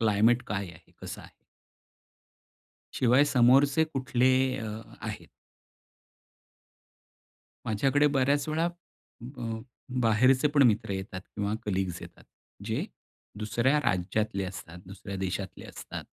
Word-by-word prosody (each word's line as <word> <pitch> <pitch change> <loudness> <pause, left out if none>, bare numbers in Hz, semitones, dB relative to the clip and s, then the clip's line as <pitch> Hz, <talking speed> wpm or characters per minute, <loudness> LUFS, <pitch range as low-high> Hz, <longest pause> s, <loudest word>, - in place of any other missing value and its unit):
Climate 115 +3 +3
काय 100 -2 -3
आहे? 80 - -18
कसा - - -7
आहे? - - -15 1.6
शिवाय 130 +3 +4
समोरचे 140 +3 +4
कुठले 130 -4 +1 0.3
अ, 110 - -4 0.4
आहेत. - - -6 2.4
माझ्याकडे 135 +7 +2
बऱ्याच 140 +1 +2
वेळा 160 +2 0
अ, 175 - -1 0.7
अ, 115 -1 -3 0.4
बाहेरचे 130 +5 +4
पण 145 -1 +4
मित्र 110 -1 +1
येतात 95 0 -5
किंवा 105 +2 -4
कलीग्स 95 -3 -2
येतात - - -13 0.4
जे - - -1 0.5
दुसऱ्या 115 +7 +1
राज्यातले 100 -1 -1
असतात, 90 -2 -8
दुसऱ्या 100 +1 -7
देशातले 95 0 -4
असतात. - - -8
115 Hz, 110 wpm, -28 LUFS, 100-135 Hz, 2.4 s, शिवाय